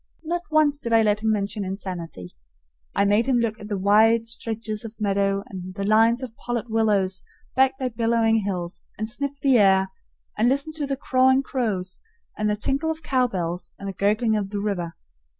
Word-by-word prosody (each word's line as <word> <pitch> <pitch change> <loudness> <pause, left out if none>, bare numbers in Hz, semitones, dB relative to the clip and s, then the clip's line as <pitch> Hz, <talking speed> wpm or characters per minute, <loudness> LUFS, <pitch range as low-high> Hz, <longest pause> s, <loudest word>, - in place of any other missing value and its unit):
Not 345 +2 -2
once 305 -2 +3
did 235 -5 -3
I 225 0 +6
let 210 -1 +2
him 220 0 +1
mention 205 0 -1
insanity. 175 - -6 0.6
I 200 - +3
made 210 +4 +3
him 260 -2 +3
look 230 -1 -1
at 210 - -8
the 205 -2 -2
wide 220 +4 +4
stretches 225 -1 -4
of 225 -1 -9
meadow 200 -1 +1
and 185 -1 -8
the 200 - -3
lines 225 +4 +4
of 235 -3 -7
pollard 240 -1 -3
willows 205 -4 +1 0.3
backed 265 0 +3
by 260 -1 -1
billowing 225 -1 +2
hills, 185 -4 -3
and 215 - -2
sniff 280 +4 -4
the 265 -4 +5
air, 190 -1 +4 0.4
and 225 +3 +3
listen 280 +4 0
to 300 -2 -3
the 275 -1 -2
cawing 260 0 +3
crows 205 -9 -2 0.4
and 215 0 0
the 210 - +1
tinkle 275 +9 -1
of 320 0 -4
cowbells 195 - -1
and 200 - -7
the 195 - -4
gurgling 215 +3 +1
of 205 -2 -1
the 205 0 -3
river. 185 -5 -2
220 Hz, 190 wpm, -24 LUFS, 200-245 Hz, 0.6 s, I